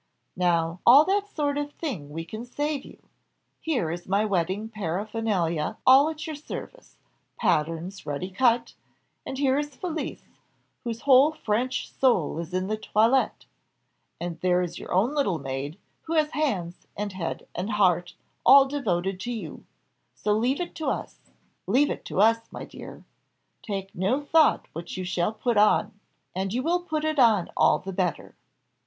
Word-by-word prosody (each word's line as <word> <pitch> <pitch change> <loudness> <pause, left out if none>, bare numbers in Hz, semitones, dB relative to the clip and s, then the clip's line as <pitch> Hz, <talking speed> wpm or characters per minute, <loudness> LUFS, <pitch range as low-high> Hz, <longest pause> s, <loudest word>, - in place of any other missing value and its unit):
Now 170 -1 +1
all 275 +5 +8
that 405 +1 +1
sort 290 -6 -1
of 290 0 -4
thing 205 - -5
we 165 +2 -6
can 215 +6 -7
save 290 +3 -3
you - - -13 0.6
here 255 - -1
is 175 +1 -6
my 200 +3 +2
wedding 190 +2 -1
paraphernalia 200 -4 -2
all 270 +4 +7
at 315 -1 -6
your 315 - -5
service 305 +11 -9 0.4
patterns 165 +5 -1
ready 150 +6 -4
cut 235 +3 +2 0.5
and 265 - -4
here 275 0 +2
is 295 -2 -5
Felicie, 330 -1 -4 0.6
whose 230 -2 -4
whole 275 +2 +6
French 250 -1 -2
soul 215 - +1
is 170 0 -6
in 185 +1 -1
the 215 +2 -2
toilette 225 +4 +1 0.7
and 175 -1 -5
there 180 0 +2
is 175 -1 -5
your - - -9
own 210 +10 +2
little 240 - +1
maid, 135 +3 -5 0.3
who 325 - -3
has 305 -1 +2
hands, 185 - -2
and 205 -1 -3
head, 180 -3 -4
and 195 +5 -3
heart, 180 -4 +2 0.3
all 275 0 +8
devoted 195 -10 -1
to 240 +5 -4
you 205 -11 -7 0.5
so 210 - 0
leave 245 +6 +1
it 350 - -4
to 320 - -4
us - - -3 0.5
leave 270 +8 +3
it - - -5
to - - -3
us, 225 +2 +3
my - - -7
dear - - -11 0.6
take 195 -2 -5
no 195 +10 +1
thought 310 +2 +3
what 165 +3 -7
you 185 - -3
shall 180 +1 0
put 225 +1 -1
on 210 +1 +4 0.4
and 190 +3 -2
you 255 - 0
will 345 +3 +2
put 310 -3 -3
it 310 -2 0
on 220 -8 +4
all - - +4
the 195 0 -7
better." 180 -2 -2
215 Hz, 165 wpm, -26 LUFS, 180-275 Hz, 0.7 s, all